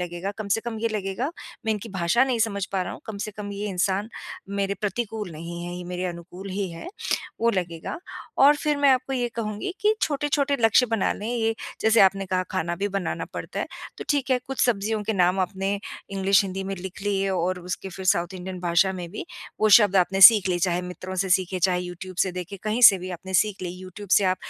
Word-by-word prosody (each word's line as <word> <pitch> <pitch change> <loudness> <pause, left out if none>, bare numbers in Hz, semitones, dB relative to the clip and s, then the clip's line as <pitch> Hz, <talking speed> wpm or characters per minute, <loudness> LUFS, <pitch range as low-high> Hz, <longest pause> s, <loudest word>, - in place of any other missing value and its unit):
लगेगा। 175 +2 -4
कम 215 -2 -5
से 225 +3 +2
कम 230 -2 -5
ये 230 - +1
लगेगा, 215 +6 -2 0.4
मैं 220 - +3
इनकी 210 +2 -5
भाषा 190 +6 +2
नहीं 255 -3 0
समझ 200 -3 0
पा 190 - +1
रहा - - -5
हूँ, - - -9
कम 215 -2 -6
से 215 +1 -4
कम 205 -1 -7
ये 205 +1 -4
इंसान 195 +3 0 0.4
मेरे 200 0 -1
प्रतिकूल 210 -1 -3
नहीं 170 +2 -7
हैं, 175 - -5
ये 180 0 -6
मेरे 180 +1 -4
अनुकूल 180 +3 -8
ही 195 0 -2
हैं, 165 - -8 0.5
वो 235 - +4
लगेगा। 175 - -3 0.4
और 290 +2 +7
फिर 300 -1 0
मैं 285 -1 +4
आपको 260 +1 +1
ये 245 -2 0
कहूँगी 215 - -3
कि 425 +1 +3
छोटे-छोटे 285 -1 +1
लक्ष्य 225 +2 +5
बना 225 -3 +1
लें 210 - -7
ये 225 -2 0 0.3
जैसे 220 +1 +4
आपने 195 0 +4
कहा 185 0 0
खाना 175 -2 -1
भी 205 +1 -1
बनाना 195 -2 -2
पड़ता - - -4
है, - - -2 0.3
तो - - -6
ठीक 280 -3 0
है, 255 - +4
कुछ 270 0 -4
सब्जियों 215 -2 0
के 220 +2 -1
नाम 185 0 +2
आपने 195 +2 -1 0.3
इंग्लिश, 195 +1 +3
हिंदी 190 0 -4
में 195 0 -3
लिख 190 +2 -8
लिए 195 -1 0
और 185 0 0
उसके 185 +2 -5
फिर 190 +1 -8
साउथ 175 +1 +2
इंडियन 185 0 -6
भाषा 175 +2 +3
में 180 -2 -6
भी 205 - -6 0.4
वो 215 - +4
शब्द 205 -3 +2
आपने 190 +1 +2
सीख 200 -1 +10
लिए, 175 - +1
चाहे 180 0 0
मित्रों 180 +1 -7
से - - -3
सीखे, 185 0 +2
चाहे 180 0 +2
यूट्यूब 180 +1 -8
से 190 - -2
देखें, 180 +2 -6
कहीं 215 +3 -1
से 195 -5 +9
भी 185 +1 -6
आपने 190 +2 -7
सीख 200 0 +2
लिए। 180 - -3
यूट्यूब 190 +2 -10
से 200 - +6
आप 185 0 +2
195 Hz, 230 wpm, -25 LUFS, 185-220 Hz, 0.5 s, सीख